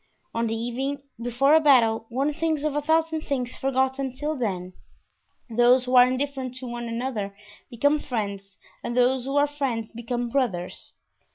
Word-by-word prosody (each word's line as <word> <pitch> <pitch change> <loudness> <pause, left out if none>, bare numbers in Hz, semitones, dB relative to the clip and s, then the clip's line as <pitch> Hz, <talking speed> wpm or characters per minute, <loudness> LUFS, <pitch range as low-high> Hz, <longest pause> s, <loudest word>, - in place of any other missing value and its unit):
On 230 0 0
the 225 - -1
evening 265 +5 -3 0.2
before 245 +5 +2
a 320 - +8
battle 230 -7 +4
one 275 +5 0
thinks 315 -1 -1
of 305 -2 -1
a 295 - +1
thousand 320 +1 +1
things 255 -5 -3
forgotten 265 0 0
till 295 +4 -3
then; 185 -8 -3 0.7
those 245 +2 +4
who 255 0 0
are 250 0 +8
indifferent 260 -1 -2
to 255 0 -7
one 240 0 -5
another 230 -4 -3 0.3
become 285 +6 +2
friends 200 -8 -4 0.3
and 240 +1 -3
those 250 0 +3
who 275 +1 -3
are 290 0 +5
friends 270 -7 -3
become 240 +1 -3
brothers. 230 -10 -2
255 Hz, 165 wpm, -25 LUFS, 235-280 Hz, 0.7 s, a